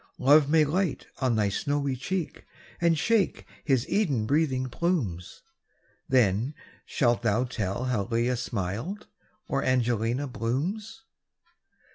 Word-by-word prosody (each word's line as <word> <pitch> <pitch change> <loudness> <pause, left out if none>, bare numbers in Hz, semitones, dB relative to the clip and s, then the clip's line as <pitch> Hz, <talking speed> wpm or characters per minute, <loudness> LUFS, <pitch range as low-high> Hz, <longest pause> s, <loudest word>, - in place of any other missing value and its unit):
Love 145 +2 +5
may 155 0 +5
light 170 +2 -1
on 130 -3 +1
thy 105 -2 +2
snowy 140 +7 -1
cheek, 170 +7 -4 0.4
And 170 -2 +3
shake 215 +3 +1 0.2
his 130 -4 +1
Eden 145 - +1
breathing 135 -1 +1
plumes; 120 - -2 0.7
Then 125 +2 +2 0.3
shalt 120 -3 +1
thou 110 +4 +2
tell 110 -3 -3
how 125 -6 0
Lelia 120 +2 +1
smiles, 115 - -3 0.5
Or 135 -2 -1
Angelina 120 +1 +1
blooms. 170 - -3
130 Hz, 115 wpm, -27 LUFS, 115-155 Hz, 0.7 s, Love